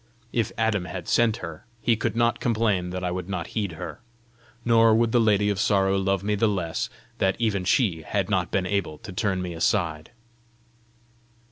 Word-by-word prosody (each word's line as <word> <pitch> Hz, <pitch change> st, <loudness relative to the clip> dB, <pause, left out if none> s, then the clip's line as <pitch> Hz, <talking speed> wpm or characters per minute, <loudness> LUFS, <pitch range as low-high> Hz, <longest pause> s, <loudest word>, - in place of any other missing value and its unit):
If 115 Hz, -2 st, 0 dB
Adam 110 Hz, -5 st, +1 dB
had 90 Hz, -1 st, -6 dB
sent 115 Hz, -2 st, +3 dB
her, 85 Hz, +3 st, -10 dB
he 115 Hz, +1 st, +2 dB
could 115 Hz, 0 st, -2 dB
not 115 Hz, 0 st, +2 dB
complain 110 Hz, -6 st, +1 dB
that 90 Hz, 0 st, -4 dB
I 90 Hz, -, -1 dB
would 90 Hz, +1 st, -4 dB
not 95 Hz, -, -2 dB
heed 100 Hz, -6 st, -2 dB
her! 80 Hz, -, -7 dB, 0.7 s
Nor 115 Hz, -1 st, +5 dB
would 115 Hz, 0 st, +2 dB
the 120 Hz, -, +4 dB
Lady 105 Hz, -2 st, +3 dB
of 100 Hz, -, -3 dB
Sorrow 95 Hz, -1 st, +3 dB
love 95 Hz, -1 st, 0 dB
me 105 Hz, +1 st, 0 dB
the 105 Hz, +2 st, +2 dB
less 90 Hz, -6 st, -2 dB, 0.3 s
that 95 Hz, 0 st, +2 dB
even 110 Hz, -5 st, 0 dB
she 90 Hz, -5 st, +2 dB
had 95 Hz, +3 st, -1 dB
not 95 Hz, -5 st, 0 dB
been 95 Hz, -2 st, 0 dB
able 90 Hz, -5 st, -1 dB
to 100 Hz, +4 st, -10 dB
turn 95 Hz, -1 st, 0 dB
me 90 Hz, -1 st, -4 dB
aside! 80 Hz, -3 st, 0 dB
100 Hz, 190 wpm, -25 LUFS, 90-110 Hz, 0.7 s, Nor